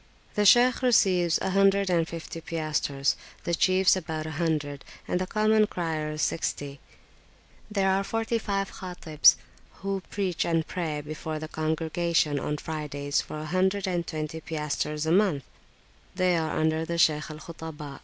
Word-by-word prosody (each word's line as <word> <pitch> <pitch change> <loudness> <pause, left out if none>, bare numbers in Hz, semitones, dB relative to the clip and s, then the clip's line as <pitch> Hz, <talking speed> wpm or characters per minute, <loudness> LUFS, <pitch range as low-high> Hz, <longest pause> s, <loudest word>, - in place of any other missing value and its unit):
The 210 -1 +3
Shaykh 245 +4 +6
receives 185 -9 +4
a - - 0
hundred 195 0 +4
and 165 -2 +2
fifty 165 0 -7
piastres, 155 -4 -1 0.3
the 170 - -2
chiefs 185 +3 +4
about 160 -3 -4
a 160 - -5
hundred, 150 -3 -2 0.2
and 180 - 0
the 185 - -2
common 215 +1 +3
criers 155 -4 -2
sixty; 145 -3 -2 0.9
there 200 -2 +1
are 190 +1 +2
[p.374]forty 225 +2 -1
five 195 -2 -2
Khatibs, 175 -5 +3 0.5
who 195 -1 -1
preach 190 -4 -1
and 165 -2 +1
pray 160 -5 -3
before 155 +1 -5
the 155 0 -5
congregation 160 -1 0
on 150 - -2
Fridays 145 -2 -2
for - - -7
a 155 - -5
hundred 190 +4 +1
and 175 -3 -1
twenty 155 +1 -4
piastres 150 -1 -2
a 160 - +1
month; 180 -7 +3 0.7
they 180 -1 +2
are 160 -1 0
under 160 0 +1
the 170 +1 -3
Shaykh 155 -2 +3
al 155 - -7
Khutaba. 155 -3 -8
165 Hz, 155 wpm, -27 LUFS, 155-190 Hz, 0.9 s, Shaykh